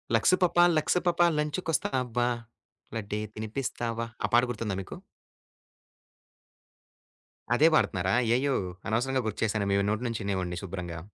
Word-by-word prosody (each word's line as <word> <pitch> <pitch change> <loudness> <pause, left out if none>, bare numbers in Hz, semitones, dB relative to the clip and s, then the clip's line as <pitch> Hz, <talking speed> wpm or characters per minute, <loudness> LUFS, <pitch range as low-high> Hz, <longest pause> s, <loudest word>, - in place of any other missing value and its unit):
Lux 115 +11 +4
పాప 175 -1 +2 0.2
Lux 155 - +2
పాప 175 0 +1 0.2
లంచికొస్తావా, 135 -6 0 0.7
లడ్దే 105 -1 -3 0.2
తినిపిస్తావా 115 +1 -3 0.2
ఆ - - -2
పాట 120 - +7
గుర్తుందా 105 -3 -3
మీకు? 95 - -8 2.6
అదే 155 +5 +6
పాడుతున్నారా? 95 - +1
అయ్యయో! 130 +4 +2 0.3
అనవసరంగా 125 +3 0
గుర్తుచేశాను 110 -2 -1
మీ 100 - +3
నోటి 110 +3 -2
నుంచి 115 -1 -3
వినేవాడిని 95 -3 -2
శుభ్రంగా. 85 -3 -5
115 Hz, 115 wpm, -28 LUFS, 100-135 Hz, 2.6 s, పాట